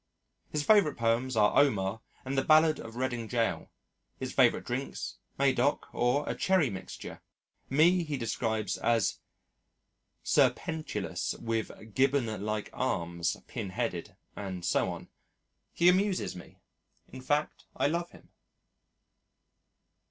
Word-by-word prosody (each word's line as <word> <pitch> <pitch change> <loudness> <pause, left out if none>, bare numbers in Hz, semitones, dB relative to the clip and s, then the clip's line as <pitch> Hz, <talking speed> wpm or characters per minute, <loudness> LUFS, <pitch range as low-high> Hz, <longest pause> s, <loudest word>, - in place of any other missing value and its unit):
His 150 -1 -1
favourite 200 -5 +4
poems 115 +2 +1
are 105 -1 +4
Omar 110 -6 +2 0.2
and 135 +1 -3
the 135 - +2
Ballad 155 +1 +5
of 115 0 -9
Reading 120 -3 -2
Jail, 115 -2 -1 0.5
his - - -5
favourite - - +3
drinks - - -4 0.2
Medoc 140 +1 +2
or 125 +5 +1
a - - 0
Cherry 185 - +2
Mixture. 95 -1 -8 0.5
Me 170 +6 +4
he 150 -3 -3
describes 110 -3 -1
as 115 -3 +1 1.0
serpentilous 160 -1 0
with 110 -1 -4
Gibbon 130 -6 +1
like 105 0 -3
arms, 85 0 -1
pinheaded, 110 -5 -4 0.2
and 95 -3 -5
so - - +2
on. - - -7 0.6
He 170 - +2
amuses 185 - +2
me. 90 - -12 0.5
In 130 - -9
fact 145 +3 -1
I - - +1
love 170 +4 0
him. - - -18
125 Hz, 120 wpm, -30 LUFS, 110-150 Hz, 1.0 s, Ballad